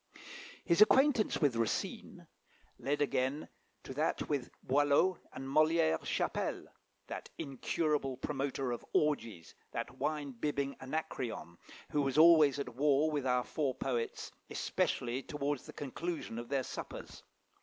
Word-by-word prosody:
His 170 +3 +3
acquaintance 260 +1 +5
with 145 -7 +3
Racine 115 -1 -2 0.5
led 145 +2 +1
again 135 +1 -1 0.4
to - - -7
that 150 +4 0
with 140 -4 -1
Boileau 145 +7 +3
and 135 - -7
Molière 155 - +3
Chapelle, - - -1 0.4
that - - -7
incurable 140 -1 -1
promoter 135 -1 -2
of 120 - -4
orgies, 115 - 0 0.2
that - - -5
wine 145 0 -1
bibbing 140 +2 -2
Anacreon, 130 - -4 0.4
who 150 - +2
was 135 0 0
always 155 -4 +7
at 140 - -4
war 145 +3 +3
with 145 -3 -1
our 125 0 +2
four 140 -3 -1
poets, 120 -3 -3 0.2
especially 125 +2 -1
towards 145 0 -3
the - - -9
conclusion 145 -3 -4
of 120 - -8
their 135 -2 +1
suppers. - - -7
140 Hz, 130 wpm, -33 LUFS, 130-150 Hz, 0.5 s, always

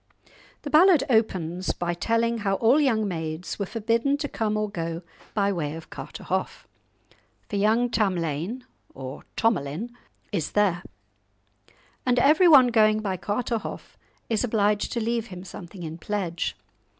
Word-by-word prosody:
The 290 - -5
ballad 330 -2 +6
opens 185 -6 +1
by 175 0 -2
telling 230 +5 0
how 195 -2 0
all 240 +9 +4
young 225 -7 +2
maids 160 0 -4
were 200 - -2
forbidden 230 +6 +1
to 290 0 -3
come 215 -5 -1
or 215 0 0
go 170 -3 -4 0.3
by 200 -1 +2
way 155 -4 -3
of 165 - -11
Carterhaugh, - - -4 0.8
"for - - -5
young 220 +4 +3
Tamlane 190 - -1 0.3
(or 130 0 -8
Thomalin) 200 0 0 0.4
is 185 -7 -2
there," 195 -4 +2 1.2
and 250 -1 +2
every 305 +8 +5
one 270 -6 +8
going 215 -2 +4
by 195 -3 -1
Carterhaugh 220 +4 -3 0.3
is 225 0 0
obliged 210 -3 +1
to 240 - -1
leave 230 0 -1
him 180 -3 -9
something 180 -1 -9
in 160 +1 -6
pledge. 180 -4 -2
210 Hz, 140 wpm, -25 LUFS, 175-235 Hz, 1.2 s, one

